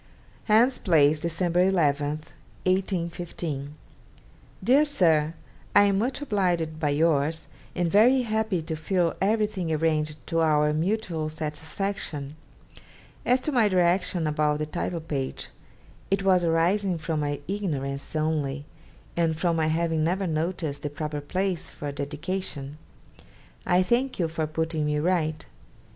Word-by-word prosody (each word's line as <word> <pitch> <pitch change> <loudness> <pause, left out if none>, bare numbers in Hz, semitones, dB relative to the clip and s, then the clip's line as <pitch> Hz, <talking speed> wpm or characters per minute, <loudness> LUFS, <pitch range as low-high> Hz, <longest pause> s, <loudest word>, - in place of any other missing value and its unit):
'Hans 235 +4 +4
Place, 155 -4 +4
December 170 +2 0
11 150 -6 +2 0.6
(1815). 170 -6 -2 0.9
'DEAR 275 +4 +5
SIR, 165 - +2 0.4
I 205 - +8
am 200 -1 +3
much 260 +6 -1
obliged 175 - 0
by 150 -2 +1
yours, 155 +1 +1 0.3
and 175 -1 +1
very 245 +6 +5
happy 220 -6 -1
to 160 0 -4
feel 170 +2 0
everything 210 -4 0
arranged 155 -3 0
to 165 - -1
our 150 -2 +3
mutual 165 -2 -1
satisfaction. 155 -1 -4 0.9
As 250 +1 +4
to 305 - -1
my 240 -6 +4
direction 180 -2 +2
about 150 -1 +1
the 155 - -2
title 170 +2 -3
page, 140 -4 -4 0.6
it 195 0 +1
was 185 -2 +4
arising 175 +3 +2
from 160 0 -2
my 145 -1 -2
ignorance 145 -9 -3
only, 150 -2 -1 0.5
and 165 -2 +1
from 170 +1 +1
my 160 -1 +1
having 160 0 +1
never 185 +4 0
noticed 160 -3 -2
the 145 - -3
proper 150 0 -4
place 185 +4 -2
for 145 - -7
a - - -5
dedication. 150 0 -4 0.9
I 180 +1 +4
thank 250 +6 +1
you 170 - +1
for 160 -1 -2
putting 160 0 -2
me 150 0 0
right. 155 -1 0
165 Hz, 135 wpm, -26 LUFS, 150-190 Hz, 0.9 s, I